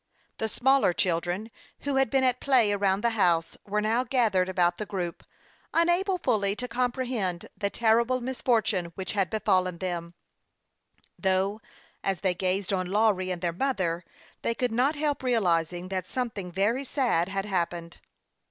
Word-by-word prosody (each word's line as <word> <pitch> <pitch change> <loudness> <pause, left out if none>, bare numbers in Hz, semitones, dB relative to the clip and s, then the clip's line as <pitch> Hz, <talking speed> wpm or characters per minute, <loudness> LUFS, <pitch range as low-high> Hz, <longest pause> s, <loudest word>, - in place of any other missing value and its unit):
The 220 - -1
smaller 265 -5 +3
children, 175 +5 -1 0.3
who 280 -1 -1
had 270 -3 +3
been 265 +1 +2
at 250 -1 +2
play 250 -7 +4
around 200 -1 +1
the 235 - +2
house, 175 -6 +2
were 210 +1 0
now 225 +4 +1
gathered 220 -8 +2
about 175 -2 +2
the 210 - -4
group, 180 -4 -4 0.5
unable 350 +3 +2
fully 210 - +1
to 250 +3 -4
comprehend 240 -7 -1
the 200 0 -1
terrible 235 +3 +2
mis 255 +1 -5
fortune 215 -7 +2
which 190 - -4
had 195 -4 0
befallen 185 -5 +1
them; 170 -2 -4 1.0
though, 195 +2 +1 0.4
as 195 -3 -1
they 185 -2 +1
gazed 185 +2 -1
on 185 -1 0
Lawry 200 -2 +2
and 180 -1 -4
their 170 -1 0
mother, 185 -7 -1 0.4
they 230 - -1
could 250 -1 -1
not 255 +7 +2
help 295 -1 -1
realizing 180 -7 +1
that 185 -1 -3
something 220 -8 -3
very 210 +9 +1
sad 240 - +1
had 195 0 -2
hap 185 -5 0
pened. 170 -1 -9
205 Hz, 160 wpm, -27 LUFS, 185-245 Hz, 1.0 s, play